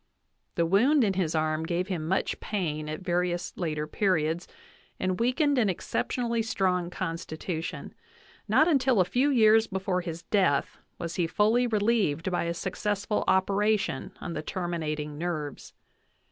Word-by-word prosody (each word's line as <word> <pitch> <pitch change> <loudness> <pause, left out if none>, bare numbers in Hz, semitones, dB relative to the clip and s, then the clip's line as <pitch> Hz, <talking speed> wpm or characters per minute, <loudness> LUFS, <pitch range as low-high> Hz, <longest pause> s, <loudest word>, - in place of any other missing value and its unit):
The 170 - +2
wound 245 - +4
in 200 -3 +2
his 175 -4 -1
arm 155 0 +1
gave 175 +2 -1
him 170 -5 -3
much 190 +3 0
pain 155 -7 -3
at 155 +3 -5
various 180 -1 -1
later 155 -4 -2
periods 165 -1 0 0.5
'and 185 -1 -1
weakened 270 +4 +2
an 215 -4 +3
exceptionally 235 +5 -1
strong 185 -5 0
constitution; 165 -1 -5 0.5
not 310 - +4
until 265 - +3
a 185 - +5
few 255 +9 +2
years 225 -4 +5
before 190 -1 -1
his 170 -1 -6
death 180 -8 +1 0.2
was 170 -1 -5
he 175 -2 +1
fully 220 +7 +2
relieved 205 -7 +1
by 175 - 0
a 170 0 -2
success 200 +3 -2
ful 210 - 0
operation 200 +3 +1
on 170 - -5
the - - -3
terminating 155 -4 -3
nerves. 155 -5 -4
185 Hz, 145 wpm, -28 LUFS, 165-210 Hz, 0.5 s, a